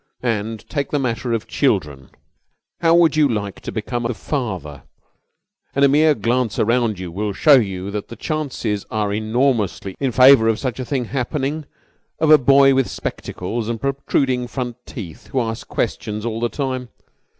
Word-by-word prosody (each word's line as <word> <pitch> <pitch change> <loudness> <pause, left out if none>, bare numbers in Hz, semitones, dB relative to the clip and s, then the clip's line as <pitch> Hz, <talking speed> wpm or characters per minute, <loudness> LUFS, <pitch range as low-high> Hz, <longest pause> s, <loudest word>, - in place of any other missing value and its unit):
"And 110 -2 -2
take 140 -3 -2
the 145 - 0
matter 125 -2 -2
of 115 -2 -1
children. 75 - -1 0.7
How 165 0 +4
would 165 -3 +4
you 155 -2 +4
like 100 -4 -3
to - - -6
become 120 +2 -3
the 120 0 -2
father 95 - -4 0.9
and 140 +1 +5
a - - +7
mere 150 +2 +4
glance 115 +1 0
around 115 -2 +1
you 90 -2 -6
will 100 +3 -2
show 150 +9 +5
you 95 -4 -2
that 105 0 -4
the 115 - -9
chances 125 - -3
are 105 -2 -1
enormously 110 -3 0
in 135 -2 0
favour 125 -1 +7
of 110 -1 +2
such 130 -1 -3
a 130 - -3
thing 130 -1 -1
happening 140 +4 -2 0.5
of 155 0 +3
a 155 - +9
boy 135 +1 +5
with 135 -1 +2
spectacles 110 +5 -4
and 115 -1 -2
protruding 135 -2 0
front 125 -2 -5
teeth 100 -1 -9
who 130 - -1
asks 115 -2 -3
questions 105 +1 -3
all 115 -1 -2
the 120 0 0
time? 130 -3 -3
120 Hz, 170 wpm, -20 LUFS, 105-135 Hz, 0.9 s, a